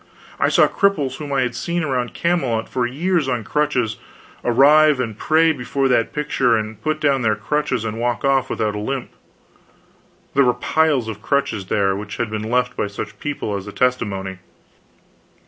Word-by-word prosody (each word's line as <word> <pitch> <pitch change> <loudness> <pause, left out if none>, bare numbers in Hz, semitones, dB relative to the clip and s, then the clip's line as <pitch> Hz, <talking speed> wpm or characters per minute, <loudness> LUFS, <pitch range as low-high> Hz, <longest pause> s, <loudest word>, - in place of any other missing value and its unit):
I - - +3
saw - - +5
cripples 150 - 0
whom 150 -2 -7
I 135 -1 +2
had 125 -1 -1
seen 170 0 -2
around 125 -5 -2
Camelot 135 -10 0
for 125 -2 -1
years 165 +4 0
on 125 -3 -1
crutches, 125 -6 0 0.5
arrive 145 +4 +5
and 115 -4 -2
pray 160 +7 +3
before 135 -1 -1
that 120 -2 +2
picture, 130 -5 +1
and 110 0 -5
put 155 0 -1
down 140 -3 +2
their 110 -2 +2
crutches 125 +2 -1
and 110 0 -4
walk 120 +3 -1
off 135 -2 +2
without 105 -2 -1
a 105 - -4
limp. 130 +4 -4 1.2
There 140 - +4
were 125 - +3
piles 155 -7 +1
of 110 -2 -6
crutches 110 -7 -1
there 95 -2 +1
which 105 +1 -6
had 115 -2 -2
been 110 0 -3
left 125 +1 +1
by - - -1
such 100 +1 -7
people 140 -8 -3
as 100 0 -6
a - - -6
testimony. 100 -7 -1
125 Hz, 180 wpm, -20 LUFS, 110-145 Hz, 1.2 s, saw